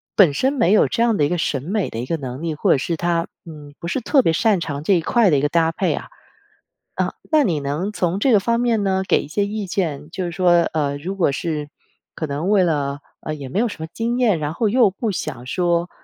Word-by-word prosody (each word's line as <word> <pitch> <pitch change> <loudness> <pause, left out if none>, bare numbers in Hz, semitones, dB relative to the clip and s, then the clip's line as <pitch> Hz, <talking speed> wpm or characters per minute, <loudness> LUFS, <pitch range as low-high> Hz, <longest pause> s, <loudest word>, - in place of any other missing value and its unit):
本 180 -8 +6
身 265 - +1
没 195 -10 +2
有 215 - +5
这 230 - 0
样 235 -2 +2
的 145 - +3
一 - - -1
个 175 - 0
审 145 -5 -1
美 195 +5 -1
的 115 - -6
一 120 - -3
个 165 - 0
能 130 -1 -6
力， 165 -2 -2
或 - - +1
者 - - +5
是 165 +5 -2
他， 170 0 0 0.2
嗯， 150 -3 -11
不 170 - -6
是 220 - -1
特 270 +4 +3
别 165 - +3
擅 205 +3 +2
长 145 -4 -4
这 195 - +3
一 175 - +3
块 225 +4 +3
的 150 - +3
一 - - +1
个 145 - +1
搭 165 0 +2
配 - - 0
啊。 - - -5 0.9
啊， - - -1 0.2
那 305 -2 +5
你 165 -8 0
能 150 +9 -2
从 180 0 -1
这 255 +3 +3
个 210 - +6
方 235 +3 +1
面 235 -3 +1
呢， 190 -1 +1
给 - - +3
一 - - -9
些 200 +6 0
意 205 -1 -4
见 155 -6 -2
就 185 +1 -3
是 175 - -4
说， 180 +1 +2 0.2
呃， 145 -3 -1
如 180 +7 -5
果 175 -7 +2
是 150 0 -3 0.4
可 160 - -4
能 150 +6 -2
为 205 -3 +4
了 145 -4 -1 0.2
呃， 155 - -4
也 145 -3 -7
没 130 - -5
有 235 +1 +1
什 160 - -9
么 160 - -4
经 235 +2 -1
验， 215 -9 +3
然 150 0 -3
后 220 +5 0
又 230 0 +4
不 215 +3 -3
想 135 -9 -5
说， 175 +4 0
170 Hz, 285 characters per minute, -21 LUFS, 150-205 Hz, 0.9 s, 本